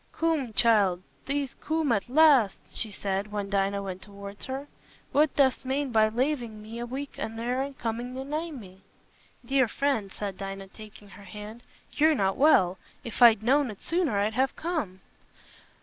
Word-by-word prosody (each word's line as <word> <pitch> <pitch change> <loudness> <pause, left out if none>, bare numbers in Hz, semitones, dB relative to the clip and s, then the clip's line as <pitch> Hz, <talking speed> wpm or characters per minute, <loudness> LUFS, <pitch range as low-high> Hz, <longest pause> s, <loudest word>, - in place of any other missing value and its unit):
"Coom, 320 -7 0
child, 200 -6 +3 0.2
thee't 280 -1 -1
coom 315 -3 0
at 215 +1 0
last," 275 -8 +5
she 220 - -2
said, 200 +1 -3
when 205 -1 -4
Dinah 200 0 0
went 185 -1 -6
towards 200 0 -9
her. 270 +2 -5 0.4
"What 295 0 +3
dost 265 -3 +3
mane 265 +1 -1
by 215 -1 +4
lavin' 240 -2 -1
me 220 +2 -8
a 240 - -4
week 275 +3 -6
an' 225 - -4
ne'er 250 +4 -2
coomin' 245 +1 -4
a 265 - -5
nigh 310 +4 -3
me?" 195 - -11 0.6
"Dear 265 0 +3
friend," 225 -5 -1
said 200 -2 -5
Dinah, 195 0 -6
taking 210 -1 -13
her 200 - -13
hand, 210 +3 -9 0.3
"you're 310 +1 +3
not 195 -5 +1
well. 190 - +4 0.2
If 235 +1 -7
I'd 225 -3 +7
known 270 +3 +3
it 210 - -10
sooner, 330 - 0
I'd 205 +2 +1
have 260 +4 +1
come." 300 - -3
230 Hz, 170 wpm, -27 LUFS, 200-275 Hz, 0.6 s, I'd